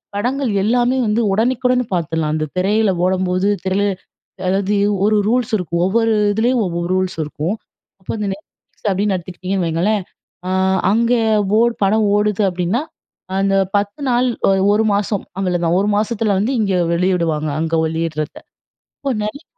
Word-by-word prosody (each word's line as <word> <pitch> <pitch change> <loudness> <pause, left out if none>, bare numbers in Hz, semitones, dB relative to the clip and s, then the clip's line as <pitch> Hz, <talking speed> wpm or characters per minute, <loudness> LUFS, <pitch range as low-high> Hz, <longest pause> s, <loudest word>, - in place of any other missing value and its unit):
படங்கள் 250 +4 -1
எல்லாமே 245 +4 +2
வந்து 215 +2 +1
உடனுக்குடன் 250 +3 +1
பார்த்துடலாம். 160 -2 -1
அந்த 155 0 -1
திரையில 205 +2 +2
ஓடம்போது, 185 +1 +1 0.2
திரையில 190 +2 +1 0.6
அதாவது 195 +2 +1 0.3
ஒரு 215 +1 +3
ரூல்ஸ் 240 0 0
இருக்கும். 170 -3 -2
ஒவ்வொரு 225 +3 +2 0.2
இதிலயும் 235 +3 +1
ஒவ்வொரு 170 0 -3
ரூல்ஸ் 185 0 -1
இருக்கும். 150 +5 -3 0.5
அப்ப 185 - -9
அந்த 210 - -2
Netflix 200 +2 -15
அப்டின்னு 200 +1 0
எடுததுக்கிட்டிங்கன்னு 185 +1 -3
வைங்களேன். 185 +6 0 0.5
அ - - -1 0.4
அங்க 230 +3 +2 0.5
ஓர் 235 +1 +3
படம் 215 +3 +3
ஓடுது 210 0 +1
அப்டின்னா, 180 +8 -1 0.6
அந்த 195 0 +1 0.2
10 205 +6 -2
நாள், 250 +1 +2 0.2
ஆ - - +5 0.2
1 215 +2 +2
மாசம் 205 0 -1 0.2
அவ்வளதான். 175 -2 +1
1 200 - 0
மாசத்துல 215 -1 0
வந்து 215 +7 0
இங்கே 195 -4 +1
வெளியிடுவாங்க. 170 -3 0
அங்க 165 0 -1
வெளியிடுறத. 160 -2 -3 0.6
இப்போ 275 - -2
நெறைய 245 +9 -5
200 Hz, 140 wpm, -18 LUFS, 180-220 Hz, 0.6 s, ஆ